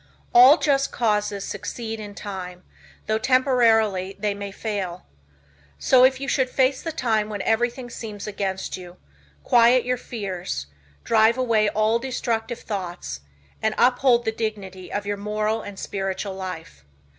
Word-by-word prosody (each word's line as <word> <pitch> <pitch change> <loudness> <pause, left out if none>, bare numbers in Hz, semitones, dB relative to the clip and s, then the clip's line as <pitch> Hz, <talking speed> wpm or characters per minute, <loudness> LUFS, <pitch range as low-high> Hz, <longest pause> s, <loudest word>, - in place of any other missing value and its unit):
All 255 +6 +9
just 275 -4 +1
causes 210 -3 0
succeed 225 -2 -5
in 205 -1 -8
time, 185 -3 -7 0.4
though 215 0 0
temporarily 225 -7 +3
they 205 0 -1
may 200 0 -6
fail. 195 -4 -4 0.7
So 255 - +5
if 260 0 +4
you 275 - -5
should 260 -2 +1
face 260 +1 +1
the 330 - -4
time 220 -8 0
when 205 -2 -4
everything 240 +3 0
seems 210 -4 -7
against 195 -2 -3
you, 180 -1 -11 0.5
quiet 240 +1 +5
your 250 0 0
fears, 185 - -5 0.4
drive 225 +1 +4
away 225 -4 +2
all 215 +2 +1
destructive 235 -2 -3
thoughts 175 - -5 0.4
and 220 0 0
uphold 245 -1 +3
the 220 - +1
dignity 200 -5 -5
of 205 0 -3
your 205 0 -2
moral 215 +2 -1
and 205 -2 -9
spiritual 195 0 -3
life. 175 - -7
215 Hz, 145 wpm, -23 LUFS, 195-240 Hz, 0.7 s, All